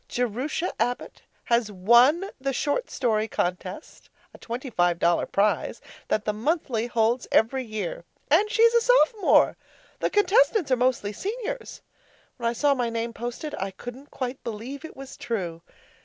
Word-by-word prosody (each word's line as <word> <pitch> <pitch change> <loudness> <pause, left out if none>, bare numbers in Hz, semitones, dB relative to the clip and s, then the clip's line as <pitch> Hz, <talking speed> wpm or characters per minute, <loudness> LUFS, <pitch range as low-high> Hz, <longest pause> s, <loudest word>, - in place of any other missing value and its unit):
Jerusha 250 - -2
Abbott 245 0 -2 0.2
has 235 -2 +1
won 240 - +5 0.2
the 275 0 -1
short 295 - -1
story 220 -4 0
contest 185 - -4 0.2
(a - - -14
twenty 245 +3 -6
five 175 -4 +2
dollar 170 0 +2
prize) 205 +1 0 0.3
that 215 - 0
the 210 - 0
Monthly 240 -1 -1
holds 235 +1 +1
every 260 +4 +3
year. 235 - -5 0.3
And 425 - +4
she's 460 +1 +4
a 470 - +5
Sophomore! 455 -5 +4 0.4
The - - 0
contestants 410 - +3
are - - +6
mostly 245 -4 0
Seniors. 475 - -5 0.5
When 235 -2 0
I - - -2
saw 285 +4 +3
my 245 -3 -1
name 230 0 -3
posted, 240 +7 -5
I 195 - -2
couldn't 245 +8 -10
quite 255 0 -5
believe 235 +6 -6
it 320 - -10
was 270 0 -9
true. 175 -8 -4
245 Hz, 155 wpm, -25 LUFS, 220-305 Hz, 0.5 s, are